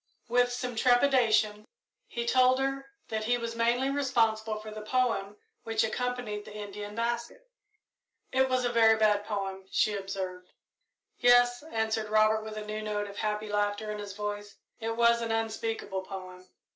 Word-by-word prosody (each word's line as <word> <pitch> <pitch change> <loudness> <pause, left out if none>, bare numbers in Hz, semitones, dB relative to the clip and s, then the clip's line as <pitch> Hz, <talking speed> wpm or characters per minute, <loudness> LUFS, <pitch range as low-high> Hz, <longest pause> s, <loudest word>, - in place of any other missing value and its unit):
With 245 +1 +3
some 245 0 -4
trepidation 230 -4 +3 0.4
he 235 0 -4
told 255 +1 +4
her 270 0 -2 0.2
that 220 -1 -2
he 245 +2 +2
was 230 -1 -4
mainly 240 +4 +1
responsible 225 -6 +1
for 215 0 -9
the 215 0 -7
poem 210 -3 0 0.2
which 225 -1 0
accompanied 245 -2 -2
the 210 - -11
Indian 205 0 -7
basket. 235 - -3 0.8
"It 265 0 +2
was 255 -1 +1
a 240 - +1
very 225 -2 +5
bad 210 -1 +3
poem," 195 -2 -4
she 215 - +2
observed. 190 -2 -5 0.7
"Yes," 245 0 +5
answered 220 -6 -2
Robert, 215 0 +4
with 215 0 -7
a 210 - -5
new 215 0 -4
note 210 -1 -2
of 200 0 -10
happy 210 0 -2
laughter 205 +1 -1
in 210 - -5
his 205 -1 -6
voice; 205 0 -5 0.2
"it 225 0 -3
was 235 0 +4
an 230 -1 -2
unspeakable 225 -3 -2
poem." 185 -1 -9
220 Hz, 160 wpm, -29 LUFS, 210-245 Hz, 0.8 s, very